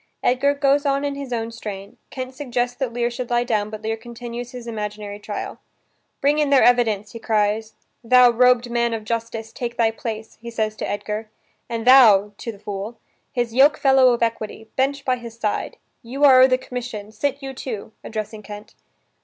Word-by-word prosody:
Edgar 275 +3 +2
goes 280 0 +2
on 280 0 +1
in 285 - -1
his 280 -2 -7
own 230 -1 -2
strain. 200 -3 -8
Kent 255 0 -6
suggests 245 -2 -2
that 260 -3 -2
Lear 240 0 -1
should 245 0 -5
lie 240 0 +2
down, 215 -4 -1
but 215 0 -8
Lear 220 0 -1
continues 240 +1 -7
his 245 -1 -9
imaginary 210 -2 -5
trial: 205 0 -6 0.6
"Bring 290 +2 +3
in 295 -2 +2
their 275 -2 +5
evidence," 220 -4 +3
he 230 - -8
cries. 215 0 0 0.3
"Thou 250 +1 +6
robed 250 0 +3
man 235 -1 +1
of 220 - -6
justice, 225 0 -4
take 240 -1 -5
thy 225 -2 +3
place," 225 -1 -7
he 235 - -7
says 220 -2 -2
to - - -4
Edgar, 210 +1 -4 0.4
"and 230 -1 -3
thou" 215 -6 +7
(to 230 - -4
the 210 - -14
fool) 205 +3 -6 0.3
"his 240 -3 -2
yoke 280 +5 +5
fellow 265 -3 +5
of 235 -1 0
equity, 220 -1 -3
bench 275 +2 0
by 255 -1 +1
his 235 -1 -10
side. 215 -2 -2 0.2
You 260 +4 -4
are 260 -3 +8
o' 260 - +8
the 255 -1 +2
commission, 240 -5 -6
sit 275 +5 -2
you 270 0 -5
too," 225 -5 -6
addressing 215 -1 -5
Kent. 210 +1 -10
235 Hz, 195 wpm, -22 LUFS, 220-255 Hz, 0.6 s, are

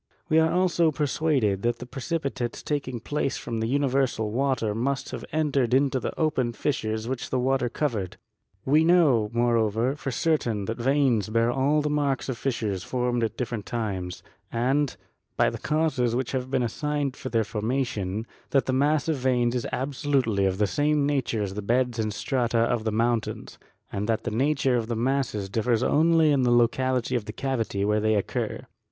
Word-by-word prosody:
We 160 0 +5
are 160 0 +3
also 175 -3 +2
persuaded 140 -9 0
that 120 +1 0
the 125 - -8
pre 130 +2 -8
cipitates 140 -6 -3
taking 135 -5 -2
place 140 +3 -2
from 115 -2 -4
the 110 - -1
universal 130 -4 +1
water 125 -3 0
must 135 +4 -2
have - - -6
entered 140 -6 +1
into 135 -1 +2
the - - -5
open 130 -7 +1
fissures 110 -5 -2
which 130 -1 -3
the 130 - 0
water 130 0 +1
covered. 115 -9 -2 0.5
We 150 +4 +4
know, 155 -11 +4
moreover, 115 +1 +1
for 145 - -5
certain 120 -7 0
that 115 +3 -4
veins 125 -5 +2
bear 115 +2 +2
all 140 +4 +2
the 150 - 0
marks 140 -3 0
of 130 - -2
fissures 110 -8 -2
formed 125 -1 -1
at 110 - -2
different 115 -4 -4
times; 95 -7 -3 0.3
and, 135 +5 +1 0.5
by - - +3
the - - -6
56 - - -8
GEOLOGY 155 +1 +2
causes 125 -7 +1
which 130 0 -1
have 130 -1 -2
been 130 -2 +1
assigned 145 +3 -2
for - - -6
their 115 -1 +2
formation, 110 -2 -2 0.2
that 135 - +2
the 130 - -1
mass 145 +3 +2
of 160 -3 +1
veins 125 -2 +1
is 125 -2 -2
absolutely 130 -6 0
of 95 0 -1
the 105 - +3
same 145 +9 +1
nature 130 -7 0
as 95 -1 -4
the 105 - -4
beds 120 +2 0
and 110 -1 0
strata 120 +1 -1
of 115 -1 +1
mountains, 115 +1 -1 0.3
and 105 +2 -3
that 110 0 0
the 120 - -3
nature 135 +2 +2
of 115 -2 -2
the 120 - -2
masses 120 -4 -1
differs 110 +3 0
only 160 +1 +4
according 140 -3 +3
to - - +3
the 120 - +5
locality 125 +1 +1
of 115 -4 -1
the 105 - -5
cavity 115 -5 -2
where 105 +1 +2
they 110 0 +2
occur. 100 - -2
125 Hz, 190 wpm, -26 LUFS, 115-140 Hz, 0.5 s, We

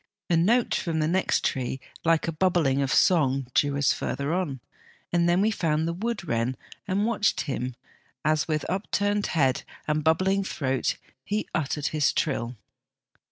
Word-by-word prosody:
A - - +5
note 225 +9 +3
from 165 -2 -1
the 155 -1 +1
next 185 +3 +1
tree 130 0 -1 0.2
like 165 -1 +2
a - - 0
bubbling 160 -5 +2
of 135 - 0
song 135 -7 +3
drew 145 -1 +2
us 140 -2 +3
further 140 +3 -2
on, 170 -8 -2 0.5
and 175 0 +3
then 175 +2 +3
we 215 +2 +3
found 160 -5 0
the 170 - -1
wood 205 0 -3
wren 115 +1 0 0.3
and 200 +2 +1
watched 215 -2 +1
him 130 -4 -3 0.5
as 155 0 +2
with 155 -2 -1
up 190 +4 -3
turned 205 0 +1
head 135 -6 +2 0.3
and 150 0 0
bubbling 185 +5 +2
throat 135 -8 -1 0.3
he 210 +6 -2
uttered 150 -1 -1
his 150 -2 +1
trill. 125 -5 -1
160 Hz, 165 wpm, -26 LUFS, 140-185 Hz, 0.5 s, A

